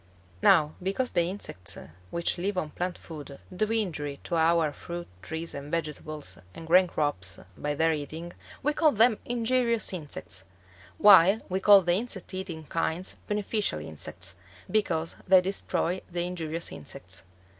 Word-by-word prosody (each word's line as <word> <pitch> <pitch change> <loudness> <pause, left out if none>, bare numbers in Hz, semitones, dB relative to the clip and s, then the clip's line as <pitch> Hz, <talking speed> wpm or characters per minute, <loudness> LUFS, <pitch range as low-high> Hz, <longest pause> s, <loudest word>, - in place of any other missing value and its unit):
Now 150 -1 +5
because 200 +7 -1
the 175 -1 +2
insects 135 - -4 0.3
which 170 - -1
live 195 +2 -1
on 155 -4 -1
plant 180 0 -3
food 145 -4 -9 0.2
do 215 +3 0
injury 160 -10 -2
to 170 - -2
our 165 -2 +3
fruit 175 +2 -7
trees 160 +1 -5
and 140 +1 -7
vegetables 155 - -4 0.2
and 165 - -8
grain 180 +3 +6
crops 95 - -1 0.2
by 145 +5 -2
their 160 +2 +3
eating, 160 +3 -5 0.3
we 295 +2 +2
call 310 -1 +4
them 225 0 +4
injurious 235 -2 +1
insects; 145 - -6 0.5
while 195 +1 +7
we 185 +1 0
call 200 0 +7
the 175 0 +2
insect 195 -2 -2
eating 185 -4 -4
kinds 165 +3 -2
beneficial 210 - 0
insects, 80 +4 -7 0.4
because 170 -7 0
they 185 0 +8
destroy 180 -1 -1
the 175 0 -1
injurious 165 -2 -2
insects. 90 +4 -8
170 Hz, 145 wpm, -28 LUFS, 155-195 Hz, 0.5 s, they